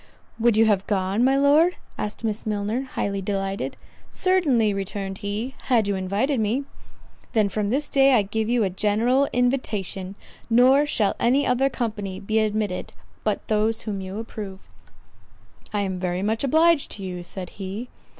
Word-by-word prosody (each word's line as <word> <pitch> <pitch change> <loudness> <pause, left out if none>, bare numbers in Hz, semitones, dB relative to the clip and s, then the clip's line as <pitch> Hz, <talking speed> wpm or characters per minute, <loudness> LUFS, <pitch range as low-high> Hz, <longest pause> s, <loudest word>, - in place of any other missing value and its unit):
"Would 230 -1 +3
you 225 - +6
have 200 -3 +2
gone, 195 +2 +1
my 270 +2 +4
Lord?" 300 +6 +4 0.2
asked 210 +2 -5
Miss 220 -1 -2
Milner, 210 +3 -1
highly 200 -1 -1
delighted. 195 0 -3 0.3
"Certainly," 285 - +2
returned 195 0 -4
he, 210 +6 -3
"had 230 -5 +3
you 200 - +1
invited 200 +8 0
me." 220 +6 0 0.7
"Then 215 -4 +3
from 205 0 -1
this 280 +6 0
day 275 0 +4
I 215 - +4
give 220 +2 -2
you 240 -2 +2
a 190 - 0
general 225 +8 +2
invitation; 210 -7 -1 0.3
nor 260 +5 +5
shall 210 -8 +1
any 265 +4 +3
other 255 +2 +2
company 210 -7 -4
be 215 +2 0
admitted 210 -3 -1 0.3
but - - -1
those 220 +1 +1
whom 200 -3 -4
you 190 +1 -6
approve." 210 -4 -7 1.1
"I 205 - 0
am 190 -2 -2
very 180 0 -2
much 220 +4 0
obliged 315 +2 +3
to 200 - -6
you," 180 -1 -5
said 180 +1 -6
he. 200 +6 -5
215 Hz, 160 wpm, -24 LUFS, 195-250 Hz, 1.1 s, you